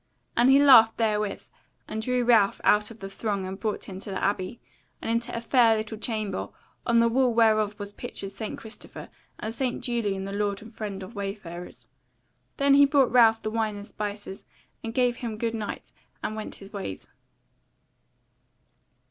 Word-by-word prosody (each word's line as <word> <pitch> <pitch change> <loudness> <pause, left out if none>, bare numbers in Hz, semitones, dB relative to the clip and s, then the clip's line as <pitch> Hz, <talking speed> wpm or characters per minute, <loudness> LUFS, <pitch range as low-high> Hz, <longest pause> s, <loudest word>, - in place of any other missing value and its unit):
And 245 +2 +5
he 270 - +7
laughed 255 -6 +7
therewith, 210 -3 0 0.4
and 220 - -4
drew 250 +2 0
Ralph 225 -5 +4
out 210 0 +4
of 230 -2 -13
the 195 - -5
throng 200 -1 -3
and 190 +1 -6
brought 215 0 -2
him 190 - -8
into 195 - -8
the 195 - -3
Abbey, 200 +3 -1 0.4
and - - -3
into 235 +1 -1
a - - -1
fair 230 -1 +4
little 215 0 -5
chamber, 215 -3 -3 0.4
on 235 0 +4
the 230 - +5
wall 250 +2 +3
whereof 215 -2 +3
was 205 0 -7
pictured 195 -1 -7
St. 210 +2 -6
Christopher, 220 0 -10 0.3
and 220 +1 -4
St. 250 0 -2
Julian 210 -6 -1
the 195 - -5
lord 200 -1 -1
and 225 +1 -13
friend 205 -3 -5
of 185 - -10
wayfarers. 195 -4 -7 0.7
Then 280 -1 +4
he 285 0 +8
brought 275 -3 +3
Ralph 225 -2 +5
the 215 - -2
wine 220 -2 -1
and 205 0 -8
spices, 205 -2 -6 0.4
and 225 - -4
gave 245 0 +1
him 230 -4 -5
good 230 0 -1
night, 215 -2 -5 0.3
and 215 - -2
went 215 - -6
his 195 +1 -13
ways. 190 - -6
220 Hz, 180 wpm, -26 LUFS, 200-235 Hz, 0.7 s, he